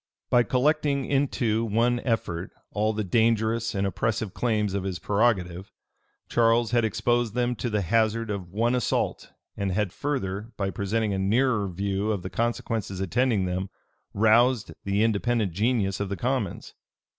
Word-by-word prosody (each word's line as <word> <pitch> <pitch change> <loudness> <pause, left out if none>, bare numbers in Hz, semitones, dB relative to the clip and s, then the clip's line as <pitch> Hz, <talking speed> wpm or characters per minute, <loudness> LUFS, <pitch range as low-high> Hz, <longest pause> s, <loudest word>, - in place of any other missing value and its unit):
By 120 - +6
collecting 140 +2 +1
into 125 -5 +1
one 115 +2 +1
effort 100 -8 -2 0.2
all 105 +1 +1
the 110 0 -2
dangerous 115 +2 +1
and 100 0 0
oppressive 100 +2 -1
claims 105 -5 0
of 100 - -1
his 95 -2 -3
prerogative, 95 -2 0 0.6
Charles 115 -1 +3
had 120 -1 +3
exposed 110 +1 0
them 125 0 +1
to 120 - -2
the 105 -2 0
hazard 115 +3 +1
of 95 -4 -5
one 115 +5 +1
assault 125 -3 -1 0.2
and 100 -1 -2
had 95 -1 -1
further, 110 -6 -3
by 100 -1 -1
presenting 105 +2 -1
a 95 - -1
nearer 110 +2 +2
view 100 +3 -1
of 100 -4 -2
the 95 - -6
consequences 110 -2 -2
attending 110 +1 +1
them, 90 +1 -2 0.4
roused 115 +2 +3
the 100 +2 +1
independent 115 -1 +1
genius 100 +1 0
of 100 -1 -2
the 100 - -3
commons. 125 -5 -2
110 Hz, 155 wpm, -26 LUFS, 100-120 Hz, 0.6 s, By